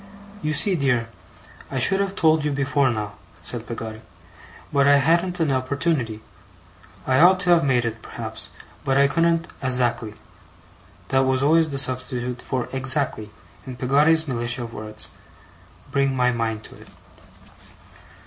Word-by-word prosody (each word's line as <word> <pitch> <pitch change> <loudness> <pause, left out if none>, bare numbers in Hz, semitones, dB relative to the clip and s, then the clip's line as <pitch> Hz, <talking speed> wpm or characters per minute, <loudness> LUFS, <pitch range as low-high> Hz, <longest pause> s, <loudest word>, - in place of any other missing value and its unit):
'You 155 -2 -1
see, 195 +6 +4
dear, 130 -7 0 0.6
I 135 - -4
should 190 +10 +3
have 200 0 -1
told 160 -3 +3
you 150 - 0
before 140 0 +1
now,' 105 -3 -3 0.3
said 120 -2 -2
Peggotty, 110 -2 -6 0.7
'but 140 0 +4
I 145 - +7
hadn't 170 +5 +1
an 160 -4 +1
opportunity. 130 -3 -1 0.8
I 130 0 +2
ought 185 +2 +6
to 180 -2 +2
have 170 -1 +5
made 125 -4 +2
it, 115 -1 -4
perhaps, - - -3 0.3
but 135 0 +1
I 140 0 +5
couldn't 165 +3 +1
azackly' 125 -4 -1 0.9
that 135 - +2
was 130 0 +1
always 160 +2 +4
the 140 - -4
substitute 125 -1 0
for 130 -3 -3
exactly, 130 -4 0 0.4
in 130 - -6
Peggotty's 150 +6 +2
militia 120 -1 -2
of 115 -1 -8
words 110 0 -5 0.8
'bring 135 -1 +1
my 125 -1 +2
mind 115 -2 -2
to - - -13
it. - - -15
135 Hz, 150 wpm, -23 LUFS, 120-155 Hz, 0.9 s, I